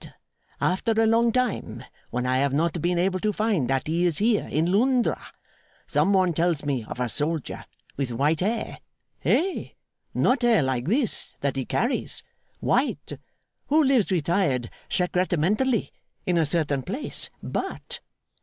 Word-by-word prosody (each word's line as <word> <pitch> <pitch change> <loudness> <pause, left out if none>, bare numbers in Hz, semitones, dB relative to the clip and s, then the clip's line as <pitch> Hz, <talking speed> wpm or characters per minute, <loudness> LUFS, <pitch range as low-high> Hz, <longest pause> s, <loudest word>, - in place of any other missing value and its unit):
After 205 +5 +1
a 225 +1 +3
long 230 +1 +4
time 210 - -1 0.3
when 125 +1 -2
I 130 0 +2
have 140 0 +1
not 165 +2 0
been 175 +1 +1
able 185 +1 +1
to 210 +3 +1
find 205 - 0
that 135 -1 +1
he 165 +3 0
is 175 -4 +2
here 215 0 +2
in 160 +4 +1
Londra, 245 +4 +2 0.6
some 155 +6 +2
one 185 -3 +3
tells 165 -2 0
me 135 -5 -1
of - - -7
a 125 - +1
soldier 150 +4 -2 0.3
with 135 -2 -1
white 145 +6 +1
hair 220 +5 -2 0.4
hey? 370 +2 0 0.4
not 255 +1 +3
hair 235 - +4
like 130 -2 -1
this 235 - 0
that 140 -1 0
he 135 -2 -2
carries 240 +3 -1 0.4
white - - 0 0.5
who 310 +2 +4
lives 260 -7 +3
retired 170 -8 +1 0.2
secrettementally, 185 - +1 0.3
in 180 - +1
a 160 - +2
certain 145 -3 0
place. 235 - -3
But! - - -4
175 Hz, 150 wpm, -25 LUFS, 145-220 Hz, 0.6 s, long